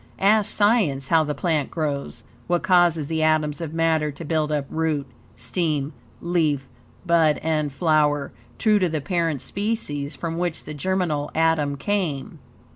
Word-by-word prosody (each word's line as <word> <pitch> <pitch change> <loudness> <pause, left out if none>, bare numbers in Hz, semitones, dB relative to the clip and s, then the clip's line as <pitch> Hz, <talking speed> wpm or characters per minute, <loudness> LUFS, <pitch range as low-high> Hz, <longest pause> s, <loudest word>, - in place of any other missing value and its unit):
Ask 210 +1 +3
Science 200 - +2
HOW 165 -1 +4
THE 150 0 -3
PLANT 155 -2 0
GROWS, 145 -4 -3 0.2
what 175 0 +1
causes 175 -4 +3
the 160 +2 -2
atoms 155 -1 +1
of 160 -3 -4
matter 160 -2 +1
to 145 +4 -9
build 155 0 0
up 145 -2 0
root, 155 -3 -1 0.3
stem, 155 -5 -2 0.3
leaf, 155 -6 0 0.4
bud 165 -3 +3
and 155 -2 0
flower, 150 -2 +1 0.3
true 215 -2 +3
to 185 -2 +1
the 155 -1 -1
parent 165 -3 -1
species 195 -9 -3
from 165 0 -4
which 175 -2 -2
the 150 - -7
germinal 155 -2 -1
atom 160 -3 +2
came. 175 -6 -2
160 Hz, 150 wpm, -23 LUFS, 145-175 Hz, 0.4 s, HOW